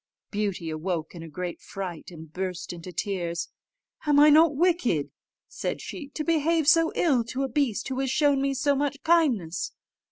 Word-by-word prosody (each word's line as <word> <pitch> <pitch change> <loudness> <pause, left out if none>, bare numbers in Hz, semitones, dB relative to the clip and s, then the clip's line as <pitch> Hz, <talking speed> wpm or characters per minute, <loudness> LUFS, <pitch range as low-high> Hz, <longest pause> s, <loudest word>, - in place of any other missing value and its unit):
Beauty 200 -6 -2
awoke 160 0 -3
in 170 - -9
a 165 - -8
great 175 +3 -5
fright, 185 -4 -6
and 160 -3 -12
burst 185 -1 -4
into 175 +1 -8
tears. 170 -3 -3 0.6
"Am 295 - +4
not 295 +1 +7 0.2
I - - -8
wicked," 265 - +1 0.4
said - - -4
she, 305 -6 -7
"to 305 - -2
behave 325 -1 +1
so 330 +1 +5
ill 270 -9 +3
to 255 +4 -3
a - - 0
beast 260 -4 0
who 260 0 -3
has 270 -1 0
shown 285 0 +3
me 275 0 0
so 280 +2 +2
much 280 0 -2
kindness? 265 - +1
245 Hz, 180 wpm, -26 LUFS, 175-290 Hz, 0.6 s, not